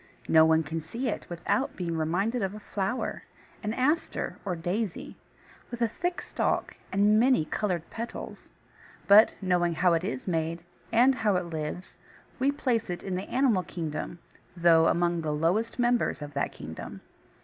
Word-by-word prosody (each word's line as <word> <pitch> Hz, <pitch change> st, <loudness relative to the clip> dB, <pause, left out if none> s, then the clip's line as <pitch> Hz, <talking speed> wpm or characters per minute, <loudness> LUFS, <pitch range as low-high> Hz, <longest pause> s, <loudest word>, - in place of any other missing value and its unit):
No 160 Hz, 0 st, +6 dB
one 160 Hz, 0 st, +4 dB
can 160 Hz, +2 st, -4 dB
see 235 Hz, -, -3 dB
it -, -, -4 dB
without 175 Hz, +10 st, -1 dB
being 170 Hz, -2 st, -3 dB
reminded 190 Hz, +10 st, 0 dB
of 195 Hz, +1 st, -2 dB
a -, -, -7 dB
flower, 205 Hz, +4 st, -3 dB, 0.4 s
an 210 Hz, -, -2 dB
Aster 285 Hz, +8 st, 0 dB
or 185 Hz, -3 st, -2 dB
Daisy, 180 Hz, +4 st, -3 dB, 0.5 s
with 240 Hz, -, -6 dB
a 235 Hz, -, +3 dB
thick 350 Hz, +10 st, -3 dB
stalk -, -, -1 dB, 0.2 s
and 205 Hz, +2 st, +4 dB
many 250 Hz, -8 st, +4 dB
coloured 175 Hz, -2 st, -2 dB
petals; 230 Hz, +1 st, -7 dB, 0.6 s
but, 210 Hz, +3 st, +8 dB
knowing 175 Hz, -2 st, +2 dB
how 180 Hz, +1 st, +3 dB
it 165 Hz, +1 st, +1 dB
is 130 Hz, -4 st, -4 dB
made, 165 Hz, -1 st, -1 dB, 0.3 s
and 250 Hz, +4 st, +5 dB
how 220 Hz, -5 st, +1 dB
it 180 Hz, -, 0 dB
lives, 160 Hz, +2 st, -6 dB, 0.4 s
we 270 Hz, +2 st, +3 dB
place 255 Hz, -8 st, -1 dB
it 175 Hz, -, -4 dB
in 190 Hz, -, -4 dB
the 185 Hz, +2 st, -4 dB
Animal 250 Hz, -7 st, +3 dB
Kingdom, 165 Hz, -1 st, -5 dB, 0.4 s
though 165 Hz, -1 st, +5 dB
among 170 Hz, -1 st, +1 dB
the 155 Hz, -, -3 dB
lowliest 175 Hz, +10 st, 0 dB
members 240 Hz, -9 st, +1 dB
of 145 Hz, 0 st, -8 dB
that 140 Hz, -, -1 dB
Kingdom. -, -, -8 dB
185 Hz, 165 wpm, -28 LUFS, 165-230 Hz, 0.6 s, but